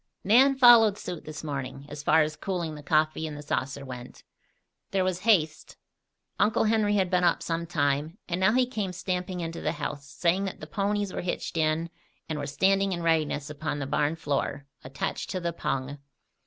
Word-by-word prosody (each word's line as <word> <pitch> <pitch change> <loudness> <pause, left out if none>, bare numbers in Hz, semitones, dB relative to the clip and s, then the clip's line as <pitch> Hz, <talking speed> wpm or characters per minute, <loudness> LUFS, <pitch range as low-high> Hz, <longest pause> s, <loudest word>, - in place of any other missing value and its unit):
Nan 260 +7 +5
followed 235 -5 +7
suit 180 -4 -6
this 155 0 -7
morning, 140 -2 -5
as 145 0 -7
far 155 +2 +4
as 155 0 -3
cooling 170 -1 -3
the 150 - -9
coffee 155 +1 +1
in 150 - -6
the 145 - -8
saucer 140 -1 -3
went. 125 -2 -9 0.7
There 195 -1 +1
was 185 -1 -1
haste. 180 -8 +1 0.6
Uncle 215 - +3
Henry 215 -1 +2
had 190 -2 +1
been 180 -1 +2
up 175 - +2
some 170 0 -2
time, 150 +1 0
and 175 0 -2
now 190 +2 +4
he 255 0 +4
came 210 -7 -3
stamping 180 0 -3
into 165 0 -5
the - - -1
house, 140 -1 -5
saying 185 +3 +1
that 190 - -5
the - - -7
ponies 200 +2 -1
were - - -3
hitched 175 -1 -4
in 160 +1 0 0.4
and 155 -2 -3
were 145 - -4
standing 195 +6 +2
in 170 -1 -4
readiness 155 -3 0
upon 150 0 -3
the 140 - -3
barn 150 +3 0
floor, 145 -2 -2 0.2
attached 135 +2 -4
to 185 - -2
the 170 -1 -2
pung. 140 -2 -3
165 Hz, 195 wpm, -27 LUFS, 150-190 Hz, 0.7 s, followed